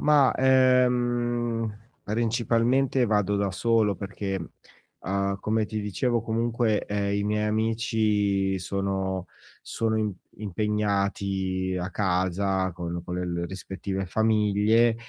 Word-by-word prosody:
Mah, 145 -3 +5
ehm, 120 -3 +2 0.4
principalmente 120 +4 +1
vado 105 -3 +1
da 100 -1 0
solo 110 0 +2
perché, 100 -1 -4 0.6
uhm, 100 0 -1
come 110 0 0
ti 110 0 -3
dicevo 115 +4 0
comunque, 115 -1 0
ehm, 100 0 -1
i 100 - -1
miei 105 +1 0
amici 105 -3 +1
sono 95 0 -2 0.3
sono 110 -1 -1
im 105 -1 0 0.2
impegnati 100 -2 -1
a 90 +1 -3
casa 95 0 0
con 85 0 -5
con 90 0 -5
le 90 0 -2
l 85 0 -2
rispettive 95 0 -5
famiglie, 110 +2 +3
105 Hz, 110 wpm, -26 LUFS, 95-115 Hz, 0.6 s, Mah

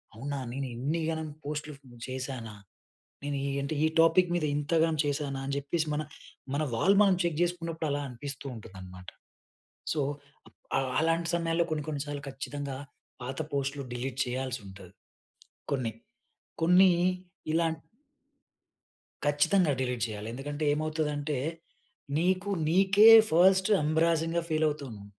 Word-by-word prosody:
అవునా! 140 +5 -4
నేను 135 +1 -3
ఇన్నిగనం 160 +4 -2 0.2
పోస్ట్‌లు 150 +1 -4 0.4
చేశానా? 130 -4 -5 0.7
నేను 145 0 -2
ఈ - - -1
అంటే 140 +3 -3
ఈ - - +5
టాపిక్ 170 +2 +5
మీద 175 -3 +1
ఇంతగనం 160 +2 +1
చేసానా? 140 -1 -2
అని 140 - -3
చెప్పేసి 155 +3 -1 0.7
మన 150 - +1
వాల్ 195 - +4
మనం 195 -2 +4
చెక్ 170 -3 -1
చేసుకున్నప్పుడు 165 -2 -2
అలా 145 +1 -1
అనిపిస్తూ 135 +3 -7
ఉంటుందన్నమాట. 95 -3 -11 0.8
సో 155 - -1 0.8
ఆ - - +4 0.2
అలాంటి 165 +1 +1
సమయాల్లో 170 0 +1
కొన్ని 155 -2 -1
కొన్ని 145 -2 -2
సార్లు 145 -1 -5
ఖచ్చితంగా 140 0 -5 0.5
పాత 130 +2 -5 0.2
పోస్ట్‌లు 140 0 -1
డిలీట్ 125 +1 -4
చేయాల్సి 130 0 -3
ఉంటది. 95 -1 -12 0.8
కొన్ని. 130 -5 0 0.7
కొన్నీ 180 +3 +6 0.6
ఇలాం 165 0 +2 1.5
ఖచ్చితంగా 150 +3 +3
డిలీట్ 125 -2 0
చేయాలి. 105 0 -6
ఎందుకంటే 145 +4 -4
ఏమవుతదంటే 150 -1 -1 0.8
నీకు 185 +4 +1 0.2
నీకే 195 +5 +6 0.2
ఫస్ట్ 190 +4 +5 0.2
ఎంబ్రాసింగ్‌గా 165 +2 +2
ఫీల్ 155 -1 +1
అవుతుంది. 135 -9 -6
150 Hz, 120 wpm, -29 LUFS, 135-165 Hz, 1.5 s, కొన్నీ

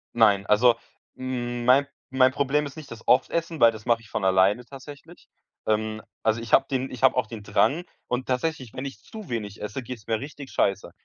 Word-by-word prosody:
Nein, 105 -4 +4
also 115 +3 +5 0.4
m 120 -2 -4
mein 135 +3 +5 0.2
mein 130 0 +4
Problem 145 +2 +1
ist 140 - -8
nicht 155 -3 -10
das 115 -1 -11
oft 130 +2 +4
essen, 165 -1 -2
weil 115 -1 +7
das 110 0 -11
mache 115 -1 +2
ich 110 - -17
von 95 - -2
alleine 95 +5 +3
tatsächlich. 145 +5 -12 0.4
Ähm, 110 0 0 0.2
also 110 +1 +1
ich 115 -2 -7
hab 135 - +6
den 130 -1 -2
ich 125 -1 -8
hab 130 0 +6
auch 125 -3 0
den 110 -2 -8
Drang 155 +10 +2 0.2
und 125 +1 -2
tatsächlich, 130 -2 -2
wenn 130 - -5
ich 135 - -7
zu 215 -7 -10
wenig 105 -4 -4
esse, 125 +5 -5
geht's 120 -3 -9
mir 110 -1 0
richtig 140 0 -9
scheiße. 100 -2 0
125 Hz, 210 wpm, -25 LUFS, 110-135 Hz, 0.4 s, weil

